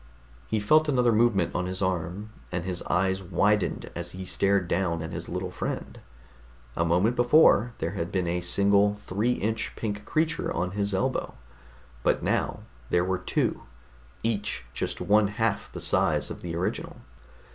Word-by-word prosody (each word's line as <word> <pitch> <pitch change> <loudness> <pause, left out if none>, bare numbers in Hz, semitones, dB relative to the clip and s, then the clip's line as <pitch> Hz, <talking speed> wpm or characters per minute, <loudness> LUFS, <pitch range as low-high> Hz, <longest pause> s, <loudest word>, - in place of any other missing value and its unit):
He 110 - 0
felt 155 +9 +4
another 125 -4 +3
movement 110 -6 +2
on 90 0 -1
his 95 0 -3
arm, 95 +3 -2 0.2
and 90 -1 -3
his 90 -2 -3
eyes 95 +2 +1
widened 100 +3 0
as 85 0 -5
he 95 0 -6
stared 95 0 +1
down 85 -3 0
at 80 - -6
his - - -5
little - - -3
friend. - - -5 0.8
A 85 - +1
moment 90 +8 +2
before, 120 -3 +5
there 80 - -2
had 85 -3 -4
been 95 -2 0
a 90 +1 -1
single 100 +3 +3
three 105 +4 -1
inch 110 0 -2
pink 105 -2 -4
creature 160 0 0
on 90 +2 -1
his 100 0 -1
elbow. 130 +8 -1 0.7
But - - +1
now - - 0 0.3
there 90 0 +2
were 95 0 -1
two, - - -1 0.6
each 105 -2 -1
just - - -3
one 105 0 +4
half 115 +2 -1
the - - -7
size - - +1
of - - -7
the 85 -2 -5
original. 85 +2 -3
100 Hz, 165 wpm, -27 LUFS, 90-110 Hz, 0.8 s, before